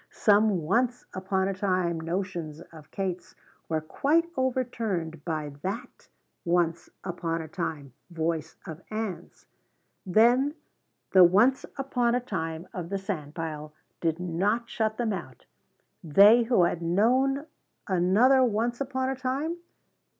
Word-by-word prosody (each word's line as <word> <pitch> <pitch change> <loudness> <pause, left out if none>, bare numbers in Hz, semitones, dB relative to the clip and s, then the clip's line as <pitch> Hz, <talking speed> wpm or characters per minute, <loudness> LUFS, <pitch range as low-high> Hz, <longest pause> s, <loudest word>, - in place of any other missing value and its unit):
Some 205 -4 +3
once 240 +9 0
upon 190 0 -1
a 195 - -1
time 185 -3 0
notions 170 -2 -4
of 160 -3 -14
Kate's 185 -2 -4 0.3
were 160 -1 0
quite 295 - +1
overturned 230 - -2
by 155 -3 -3
that 220 - -6 0.3
"once 170 -1 0
upon 170 -2 -3
a - - -9
time" 155 -6 -5 0.2
voice 165 -1 -2
of 160 +1 -8
Ann's. 210 -6 -5 0.6
Then 240 - +3 0.6
the 185 -1 +8
once 210 +10 +4
upon 245 -3 +1
a - - +2
time 165 -7 -4
of 175 -3 -5
the 195 - -1
sandpile 155 -5 -5 0.3
did 165 0 -1
not 195 +7 0
shut 220 -1 -1
them 230 -3 0
out 130 -10 -8 0.6
they 205 +9 +6
who 230 -6 +3
had 170 0 0
known 255 - +2 0.4
another 205 +9 +4
once 235 +2 0
upon 260 -1 -1
a 265 - -1
time? 270 +6 -2
190 Hz, 130 wpm, -27 LUFS, 165-240 Hz, 0.6 s, the